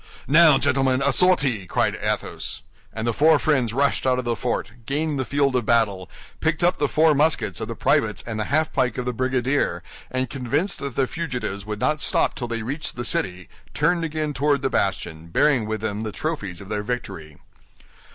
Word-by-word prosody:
"Now, 155 0 +7
gentlemen, 135 0 +2
a 140 - +3
sortie!" 135 - +2
cried - - +1
Athos. - - -2 0.3
And 110 0 -4
the 120 - +1
four 155 +5 +5
friends 130 -4 +1
rushed 140 +2 +1
out 130 -1 +3
of 125 - -3
the 120 -1 0
fort, 120 +1 -2 0.2
gained 150 +1 -1
the 130 - -1
field 140 -1 +1
of 120 -4 0
battle, 105 -6 +1 0.3
picked 160 +2 0
up 180 +1 +2
the 145 - +2
four 155 +2 +4
muskets 150 -4 +1
of 110 - -3
the 115 - -5
privates 130 -8 +1
and 110 -2 -4
the 110 - -1
half 155 +3 +1
pike 125 -3 0
of 125 - -3
the 125 - -1
brigadier, 130 +3 0 0.3
and 130 +1 -1
convinced 140 - -1
that 140 -3 -5
the 135 - +2
fugitives 125 - -4
would 105 -1 -4
not 150 +3 0
stop - - +2
till 120 - -5
they 115 -1 -3
reached 145 +6 -4
the 120 0 -4
city, 90 -5 -2 0.3
turned 175 -1 +2
again 155 -1 -2
toward 140 -1 +1
the 135 - 0
bastion, 85 -4 -2
bearing 120 - +2
with 110 -1 -3
them 105 -1 -3
the 110 -1 -4
trophies 100 - -4
of 95 - -11
their 105 -1 -2
victory. 105 -10 -5
130 Hz, 200 wpm, -23 LUFS, 110-145 Hz, 0.3 s, Now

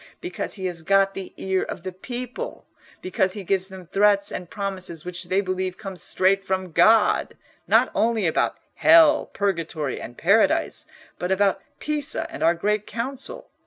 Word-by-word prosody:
Because 360 +1 -4
he 190 -3 -5
has 175 -2 -3
got 195 +3 +3
the 190 -1 -7
ear 190 -1 0
of 170 - -6
the 185 - -4
people: 250 - -6 0.4
because 185 0 0
he 205 - -6
gives 190 0 0
them 190 -2 -11
threats 200 +2 +3
and 180 -2 -6
promises, 190 -5 -4
which 180 0 -4
they 190 +2 +1
believe 185 -1 -3
come 195 -2 -7
straight 190 +2 +1
from 190 -2 -2
God, 220 +6 +4 0.3
not - - +4
only 225 -3 +1
about 160 - +1 0.2
hell, 315 -1 +6
purgatory, 165 -8 -2
and 120 - -9
paradise, 200 +6 +2 0.3
but 180 +1 -2
about 195 +1 +2 0.2
Pisa 300 +1 -2
and 320 - -8
our 170 +1 +4
Great 210 +4 -1
Council. 260 +3 -5
195 Hz, 160 wpm, -24 LUFS, 185-215 Hz, 0.4 s, hell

